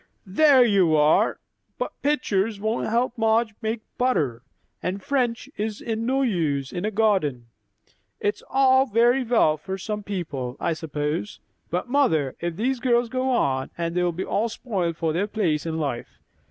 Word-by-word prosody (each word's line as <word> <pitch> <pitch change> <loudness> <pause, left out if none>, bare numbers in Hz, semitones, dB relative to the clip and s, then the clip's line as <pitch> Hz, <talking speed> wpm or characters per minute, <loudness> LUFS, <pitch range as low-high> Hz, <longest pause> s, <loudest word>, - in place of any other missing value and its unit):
"There 260 +6 +5
you 190 -8 +3
are! 150 +1 +3 0.4
But - - -3
pictures 225 -8 0
won't 220 +3 -1
help 235 +2 0
Madge 225 0 +2
make 220 0 -2 0.2
butter; 145 - +1 0.4
and 185 +2 -2
French 250 -3 0
is 210 0 -3
no 235 +4 0
use 155 - 0
in 180 +2 -3
a - - +1
garden. 195 - +1 0.7
It's 205 - -1
all 265 0 +4
very 240 +3 +3
well 225 -10 +3
for 190 +5 -5
some 210 +2 -4
people, 150 -11 -4
I - - 0
suppose; 155 +4 -3 0.3
but, 180 +8 -2
mother, 200 - +2
if 170 -1 -3
these 250 +6 -1
girls 240 -2 +2
go 255 +2 -1
on, 135 - +1
they'll 170 +1 0
be 180 +3 -4
all 225 +3 0
spoiled 190 -8 -3
for 160 -2 -1
their 190 +5 0
place 170 -8 -1
in 160 0 -2
life. 140 -6 -4
205 Hz, 155 wpm, -24 LUFS, 160-240 Hz, 0.7 s, There